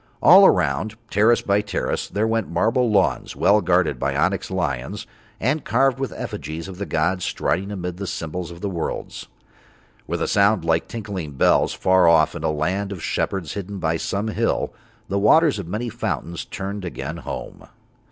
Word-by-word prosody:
All - - +8
around, 110 0 +1 0.2
terrace 110 +4 +3
by 100 +1 +2
terrace, 105 - -2
there 105 +2 -1
went 115 -1 0
marble 120 +2 +1
lawns 100 -3 +1
well 105 +1 +4
guarded 85 -7 +1
by 70 +2 -1
onyx 90 +5 0
lions 95 - -3 0.3
and 145 +6 0
carved 135 +2 +2
with 135 - -2
effigies 80 +2 -6
of 95 - -7
all - - -15
the 100 - -4
gods 90 +4 0
striding 100 +2 -1
amid 90 -3 -5
the 100 0 -5
symbols 85 +2 -4
of 85 0 -11
the 100 - -2
worlds. 85 -3 -5 0.8
With - - -2
a - - -1
sound 100 -3 +3
like 80 0 +1
tinkling 100 -9 -6
bells, 65 - +3
far 95 -1 +4
off 80 -2 +5
in - - -7
a - - +1
land 90 +7 -1
of 90 -5 -6
shepherds 95 -7 -2
hidden 100 0 -5
by 80 -2 0
some 100 +6 -2
hill, - - -1 0.3
the 100 - -1
waters 145 +5 +4
of 95 - -6
many 105 +7 -3
fountains 95 - -4
turned 100 +1 -5
again 90 - -5
home. - - -7
95 Hz, 180 wpm, -22 LUFS, 85-105 Hz, 0.8 s, All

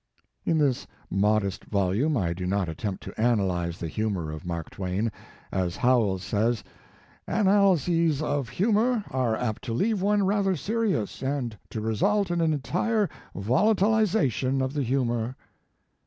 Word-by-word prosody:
* - - -47
In 165 - +3
this 140 -5 +1 0.2
modest 100 -1 +1
volume 105 +10 +1
I 85 -5 0
do 90 +1 -4
not 95 -1 0
attempt 95 +5 -4
to - - -6
analyze 95 -7 +1
the 85 - -4
humor 95 -4 -2
of 80 +2 -8
Mark 85 -2 -4
Twain. 100 +4 -2 0.4
As 90 -2 -1
Howells 110 -7 +2
says: 110 +2 0 0.3
" - - -29 0.2
Analyses 180 -6 +3
of 145 -4 -1
humor 220 +2 +1
are 125 -4 +1
apt 110 -4 -2
to 115 - -2
leave 205 - +1
one 205 0 +2
rather 195 -1 +2
serious, 200 - -1
and 135 -4 -2
to 110 - -4
result 180 - +1
in 170 -1 +1
an 160 -1 +3
entire 185 - 0 0.2
volatilization 185 - +2
of 130 +1 -1
the 145 - -1
humor." 120 -2 0
125 Hz, 150 wpm, -26 LUFS, -, 0.4 s, In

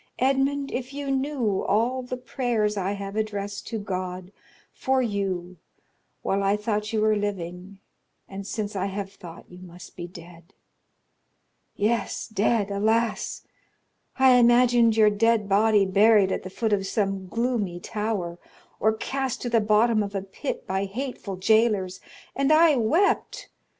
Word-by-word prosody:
Edmond, 275 +2 +1
if 260 +2 -5
you 280 -1 -3
knew 265 -7 -1
all 240 +5 +1
the 250 0 -5
prayers 240 -4 -1
I 195 0 -1
have 200 0 -6
addressed 205 -2 -3
to 225 - -3
God 185 -2 -5 0.4
for 265 0 0
you 190 -5 -3 0.7
while 195 +1 0
I 200 +1 +2
thought 210 0 -2
you 220 -1 0
were 215 0 +3
living 190 -2 -4 0.5
and 195 0 -8
since 215 -2 -4
I 195 0 -1
have 195 0 -5
thought 170 -4 -12
you 180 - -12
must 180 -1 -12
be 175 - -6
dead! 170 0 -14 1.2
Yes, 215 0 -1
dead, 215 -1 0
alas! 220 +3 0 0.7
I 265 -1 +6
imagined 240 -1 +4
your 215 -1 +6
dead 220 0 +2
body 205 0 +4
buried 200 0 +4
at - - -1
the 185 - -8
foot 220 +3 -1
of 195 -1 0
some 195 -2 -1
gloomy 225 -5 -1
tower, 195 -4 -3 0.4
or 220 +1 +3
cast 265 +3 -3
to 240 - -3
the 230 -1 +4
bottom 215 +1 +3
of 200 0 -4
a 195 - -2
pit 195 -1 -5
by 190 +1 -1
hateful 220 -2 -5
jailers, 200 -1 +2 0.3
and 275 +2 +1
I 315 -1 +6
wept! 335 - +1
210 Hz, 150 wpm, -25 LUFS, 195-235 Hz, 1.2 s, I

